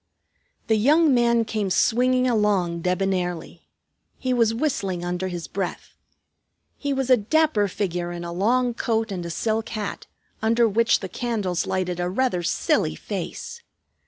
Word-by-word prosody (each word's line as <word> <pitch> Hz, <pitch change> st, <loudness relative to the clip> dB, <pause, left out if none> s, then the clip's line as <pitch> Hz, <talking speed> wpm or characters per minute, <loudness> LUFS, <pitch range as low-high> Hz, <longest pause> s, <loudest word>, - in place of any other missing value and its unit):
The 220 Hz, -, +2 dB
young 300 Hz, +6 st, +4 dB
man 235 Hz, -1 st, +3 dB
came 215 Hz, -3 st, -2 dB
swinging 250 Hz, +6 st, +2 dB
along, 200 Hz, -7 st, +1 dB
debonairly; 180 Hz, -1 st, -2 dB, 0.5 s
he 255 Hz, -1 st, -1 dB
was 230 Hz, -3 st, +3 dB
whistling 205 Hz, -, -2 dB
under 180 Hz, +1 st, -2 dB
his 175 Hz, -2 st, -5 dB
breath. 195 Hz, -3 st, -5 dB, 0.8 s
He 285 Hz, -, -3 dB
was 265 Hz, -1 st, 0 dB
a 255 Hz, -, +8 dB
dapper 240 Hz, -1 st, +2 dB
figure 175 Hz, -3 st, -3 dB
in 175 Hz, 0 st, -6 dB
a 170 Hz, 0 st, -5 dB
long 240 Hz, +7 st, +1 dB
coat 225 Hz, -1 st, -1 dB
and 180 Hz, -3 st, -4 dB
a -, -, -6 dB
silk 220 Hz, +6 st, -1 dB
hat, 210 Hz, -3 st, -5 dB, 0.3 s
under 230 Hz, +1 st, +3 dB
which 230 Hz, +2 st, +2 dB
the 190 Hz, -, -4 dB
candles 205 Hz, -5 st, -2 dB
lighted 180 Hz, -2 st, -1 dB
a 175 Hz, 0 st, -1 dB
rather 215 Hz, -2 st, 0 dB
silly 170 Hz, -, 0 dB
face. 470 Hz, 0 st, -6 dB
215 Hz, 150 wpm, -24 LUFS, 180-240 Hz, 0.8 s, a